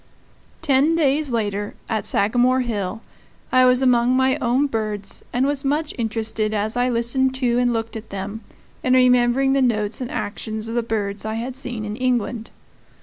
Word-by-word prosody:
Ten 290 +2 +3
days 295 -2 +1
later, 205 -3 -2
at 220 -3 -1
Sagamore 245 +5 +3
Hill, 210 -4 -3 0.5
I 255 0 +5
was 250 +1 +4
among 250 0 +3
my 260 0 +3
own 250 +4 +1
birds, 215 -6 -4
and 250 +2 +1
was 280 -1 -1
much 295 +3 -1
interested 220 -2 -2
as 215 +2 -1
I 245 +1 +1
listened 250 +2 +1
to 245 -2 +1
and 245 0 +2
looked 225 -1 -3
at 220 0 -8
them 200 +3 -5 0.4
in 255 0 +2
remembering 250 +1 +4
the 275 - +2
notes 215 -2 0
and 250 - -4
actions 215 +1 -5
of 225 - -5
the 240 - +1
birds 210 -3 -3
I 220 0 -3
had 245 +3 -4
seen 245 -5 -4
in 210 0 -4
England. 240 -2 -1
240 Hz, 175 wpm, -21 LUFS, 220-255 Hz, 0.5 s, I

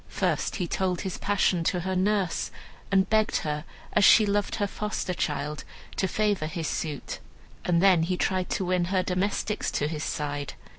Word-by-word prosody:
First - - 0
he 180 - -1
told 180 0 -1
his 190 -2 -4
passion 195 -4 +2
to 180 - +1
her 190 +2 -2
nurse, 190 -1 +1 0.4
and 190 -1 +4
begged 215 0 +2
her 150 +1 -2 0.3
as 210 - +4
she 215 +2 +8
loved 205 0 0
her 205 - 0
foster 210 -2 -3
child 150 -4 -2 0.3
to 190 - +1
favor 205 -5 0
his 160 0 -3
suit. 150 -4 -3 0.5
And 175 0 +3
then 185 -4 +6
he 180 +2 0
tried 185 0 0
to 190 - -1
win 180 -1 +1
her 185 +1 +1
domestics 200 +3 -1
to 150 - 0
his 155 -1 -4
side. 145 -1 -3
185 Hz, 180 wpm, -27 LUFS, 165-200 Hz, 0.5 s, she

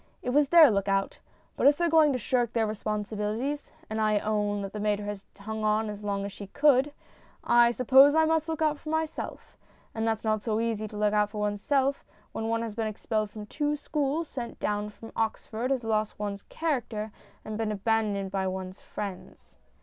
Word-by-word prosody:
It 250 - -1
was 290 +2 +4
their 315 -3 +8
look 200 -1 0
out. 195 0 0 0.4
But - - +3
if 290 0 +6
they're 345 - +2
going 315 -2 +5
to 260 - 0
shirk 240 0 0
their 230 -2 +2
responsibilities 215 +5 -3 0.2
and 220 0 -2
I 215 -1 +3
own 205 -1 -1
that 195 - -6
the 210 - -4
mater 205 0 0
has 205 -1 -6
hung 220 +2 -5
on 215 0 +1
as 210 0 -9
long 200 -1 -2
as 200 - -5
she 200 0 -9
could 285 +3 +3 0.5
I 240 0 +5
suppose 265 +4 +6
I 320 0 +5
must 320 0 +1
look 320 -1 -1
out 300 -1 +1
for 310 - -8
myself. 315 0 -4 0.3
And 225 0 0
it's 220 -1 -2
not 215 -1 +1
so 220 0 -1
easy 225 -2 -1
to 210 - -9
look 210 0 +2
out 210 -1 +3
for 210 0 -6
oneself 265 +7 0 0.3
when 225 - -3
one 230 0 0
has 225 -2 -4
been 220 0 -2
expelled 215 0 -2
from 210 0 -8
two 295 +6 -1
schools, 295 +2 -1
sent 245 -4 -6
down 210 0 -1
from 225 +2 -12
Oxford, 225 +2 -2
has 265 -3 0
lost 215 -1 -1
one's 205 -1 -4
character, 240 -9 -2 0.3
and 215 - -5
been 220 0 -1
abandoned 205 -2 0
by 190 -1 -1
one's 185 0 -5
friends. 200 -3 -8
220 Hz, 205 wpm, -28 LUFS, 210-265 Hz, 0.5 s, their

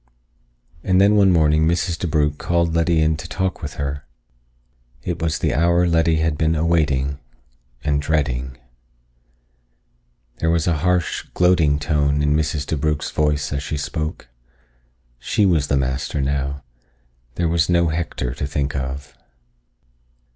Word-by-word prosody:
And 95 0 +2
then 100 +2 +5
one 100 -2 +5
morning 80 -2 +3
Mrs. 85 0 0
DeBrugh 75 -3 0
called 85 -1 0
Letty 85 0 +2
in 80 0 +1
to 75 - -8
talk 95 -1 -2
with 75 -3 -6
her. 70 0 -4 1.0
It 90 -2 -4
was 80 -2 0
the - - 0
hour 85 +4 +3
Letty 80 -1 +2
had 80 -1 0
been 80 +1 +2
awaiting 75 -4 +1 0.6
and 70 -1 +1
dreading. 65 -4 -1 1.8
There 80 - 0
was 85 -1 +1
a 85 -3 +1
harsh, 90 +2 0
gloating 85 -5 +3
tone 75 -1 0
in 75 0 +2
Mrs. 75 -1 -1
DeBrugh's 75 -1 -1
voice 75 -2 0
as 70 - -2
she 75 +1 -4
spoke. 75 0 -4 0.9
She 105 - +1
was 80 -7 +2
the 70 - +1
master 65 +2 -2
now. 70 0 -2 0.7
There 85 - 0
was 80 -1 +1
no 85 -1 +3
Hector 80 -6 -3
to 70 - -4
think 70 -1 -2
of. 65 +1 -5
75 Hz, 140 wpm, -21 LUFS, 70-85 Hz, 1.8 s, then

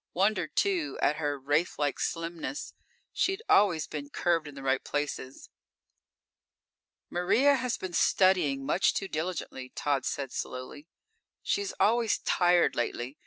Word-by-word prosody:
Wondered, 200 +4 +1
too, 365 -6 0
at 150 - +2
her 145 -2 -2
wraithlike 145 +1 0
slimness. 170 - -4 0.4
She'd 385 +3 0
always 175 -7 +4
been 145 -2 -6
curved 165 0 0
in 145 - -10
the 135 - -9
right 135 -1 +1
places. 145 -2 -4 1.6
"Maria 240 +11 +3
has 250 -3 -1
been 185 -2 -6
studying 170 -8 +3
much 185 - +2
too 195 - -2
diligently," 155 -6 -4
Tod 140 -2 0
said 135 -2 -3
slowly. 135 +4 -6 0.6
"She's 200 -1 -1
always 225 +3 +3
tired 175 -1 +3
lately. 120 +3 -3
165 Hz, 125 wpm, -29 LUFS, 145-195 Hz, 1.6 s, always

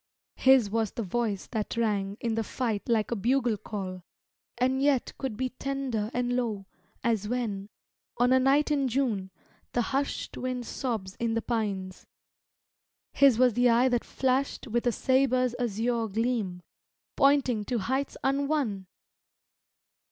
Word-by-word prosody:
His 260 -6 +5
was 225 -1 +1
the 230 - -3
voice 210 0 -2
that 220 -1 -3
rang 205 -3 0
In 230 -1 -1
the 225 0 0
fight 225 -1 -3
like 225 -2 +1
a - - +1
bugle 235 +2 +1
call, 190 -3 -6 0.6
And 260 +2 +1
yet 280 -3 +2
could 260 -6 -3
be 260 +1 -1
tender 255 -5 -3
and 245 0 -1
low 220 -6 -2 0.4
As 220 -3 +1
when, 215 -4 -2 0.5
on 245 +2 +4
a 260 - +5
night 275 +3 +3
in 280 -2 +2
June, 230 -7 0 0.4
The 240 - +2
hushed 280 +1 -2
wind 255 -1 -3
sobs 220 -7 -3
in 230 -1 -1
the 230 - 0
pines. 200 -5 -3 1.1
His 275 -5 +5
was 250 -1 +4
the 245 +2 +4
eye 240 +3 +4
that 245 -2 +1
flashed 265 +2 -1
With 240 0 -1
a - - +4
sabre's 255 0 +2
azure 230 0 0
gleam, 215 -4 -1 0.5
Pointing 275 -6 +3
to 245 - -1
heights 260 +7 -2
unwon! 275 -8 0
240 Hz, 145 wpm, -28 LUFS, 215-260 Hz, 1.1 s, His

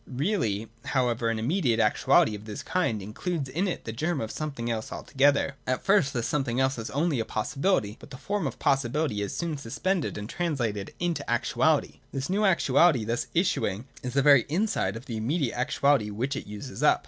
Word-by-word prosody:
Really 125 - -1 0.2
however 120 -3 0
an 115 - 0
immediate 120 - +1
actuality 110 - +4
of 105 0 -8
this 105 -1 -6
kind 115 - 0
includes 140 - -3
in 175 +9 0
it 180 - -4
the 110 - -3
germ 155 +7 -1
of 110 -3 -3
something 140 -6 -4
else 115 -2 -3
altogether. 140 0 +1
At 130 - -1
first 195 -9 +4
this 120 -3 -2
some 150 -2 0
thing 125 -1 -2
else 130 -1 +1
is 115 - -5
only 150 -1 0
a - - +1
possibility: 110 - 0
but - - -13
the 135 - -9
form 200 +1 -2
of 125 - -6
possibihty 135 -3 +1
is 100 -1 -3
soon 165 -3 -2
suspended 160 - -2
and 105 0 -5
translated 120 - -2
into 170 -4 -1
actuality. 140 +5 +1
This 135 +4 -3
new 205 +3 +1
actuality 155 - +4
thus 120 +2 -1
issuing 130 - +1 0.2
is 125 -1 -4
the 140 - +4
very 140 -4 +6
inside 160 - 0
of 115 +3 -8
the 115 -5 -4
immediate 130 +4 0
actuality 135 -2 +2
which 125 +7 -2
it - - -6
uses 105 +1 -7
up. - - +5
135 Hz, 195 wpm, -27 LUFS, 115-155 Hz, 0.2 s, very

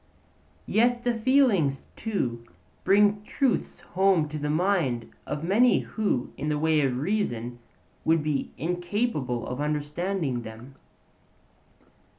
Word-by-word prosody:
Yet 240 +2 +2
the 245 - +1
feelings 225 - +2
too 125 - -2 0.4
bring 205 +1 +4
truths 260 +2 -1
home 185 -4 +2
to 155 0 -5
the 150 0 -2
minds 155 -8 +1 0.2
of 150 - -3
many 220 +8 +4
who 205 - -2
in 150 - -2
the 150 - 0
way 155 0 +2
of 130 -3 0
reason 125 - -2 0.4
would 160 -1 +2
be 150 -2 -1
incapable 175 - -1
of 125 +3 -4
understanding 150 -1 -2
them. 115 +4 -10
160 Hz, 120 wpm, -26 LUFS, 135-205 Hz, 0.4 s, bring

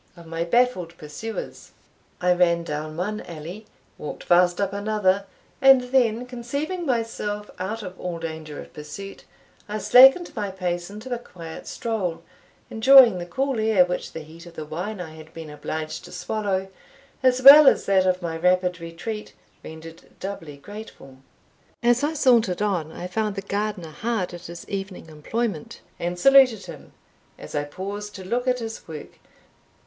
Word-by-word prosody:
of 170 - -13
my 165 +1 -3
baffled 180 -4 +1
pursuers. 155 +10 -7 0.5
I 180 0 +3
ran 170 -1 +2
down 155 0 -5
one 210 +4 -2
alley, 175 +6 -9 0.3
walked 150 - -7
fast 175 0 +4
up 200 -1 0
another; 200 -1 +1 0.4
and 270 -1 +8
then, 245 -2 +2
conceiving 280 +8 -4
myself 225 -4 -2
out 215 +4 -4
of 185 -1 -9
all 175 -2 -4
danger 160 -2 -6
of - - -11
pursuit, 170 +6 -9 0.4
I 210 - -2
slackened 270 - +6
my 205 -3 -2
pace 180 -2 -3
into 215 +5 -6
a 240 - -3
quiet 165 -8 -10
stroll, 205 -8 -3 0.5
enjoying 235 -3 +7
the 175 - -6
cool 265 +6 -1
air 215 -4 +4
which 180 0 -4
the 160 - -6
heat 165 +3 -13
of 170 - -13
the 155 - -6
wine 180 +7 -5
I 160 -3 -7
had 160 0 -14
been 160 -2 -8
obliged 155 +1 -5
to - - -12
swallow, 190 +1 -2 0.5
as 255 -1 +3
well 285 +2 +11
as - - +5
that 190 -1 +3
of 185 0 +1
my 165 -1 -3
rapid 180 +1 +2
retreat, 170 +6 -7 0.3
rendered 160 +1 -10 0.2
doubly 165 -7 -6
grateful. 205 -6 -11 0.7
As 240 +2 +3
I 310 +2 0
sauntered 235 - +3
on, 175 -7 -1
I 175 - -7
found 210 +2 -2
the 195 - -5
gardener 200 -4 -3
hard 215 0 -2
at 175 0 -9
his 170 0 -9
evening 195 -4 -6
employment, 165 +3 -4 0.2
and 175 +1 -3
saluted 255 -1 +5
him, - - -11 0.4
as - - -10
I 145 0 -1
paused 200 +6 -6
to 190 - -8
look 245 +6 -1
at 250 0 +2
his 225 -2 -7
work. 155 -3 -9
190 Hz, 165 wpm, -24 LUFS, 170-225 Hz, 0.7 s, well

